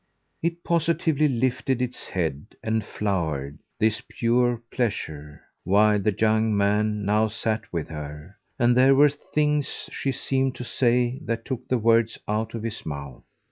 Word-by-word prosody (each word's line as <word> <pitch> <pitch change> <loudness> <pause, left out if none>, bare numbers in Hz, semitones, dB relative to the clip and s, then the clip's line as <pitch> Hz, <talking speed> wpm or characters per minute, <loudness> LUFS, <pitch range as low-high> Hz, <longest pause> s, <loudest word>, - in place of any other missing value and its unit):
It 170 +1 -2
positively 160 -2 +2
lifted 130 0 0
its 125 0 -3
head 80 -1 -3
and 110 0 0
flowered, 80 -10 -2 0.2
this 110 -1 +2
pure 120 0 +1
pleasure, 75 - -3 0.2
while 105 +2 +4
the 100 0 0
young 110 -1 +3
man 105 +1 +1
now 105 +2 +3
sat 110 0 -3
with 85 -3 -3
her, 75 +4 -8 0.2
and 120 -2 +3
there 130 +2 +6
were 145 +2 +7
things 150 0 -1
she 135 - -2
seemed 130 0 0
to - - -6
say 125 +1 +1
that 115 0 -2
took 130 -3 -5
the 130 - +2
words 115 0 +3
out 110 +2 -1
of 115 - -5
his 115 -2 -4
mouth. 70 -4 -7
110 Hz, 150 wpm, -25 LUFS, 100-125 Hz, 0.2 s, were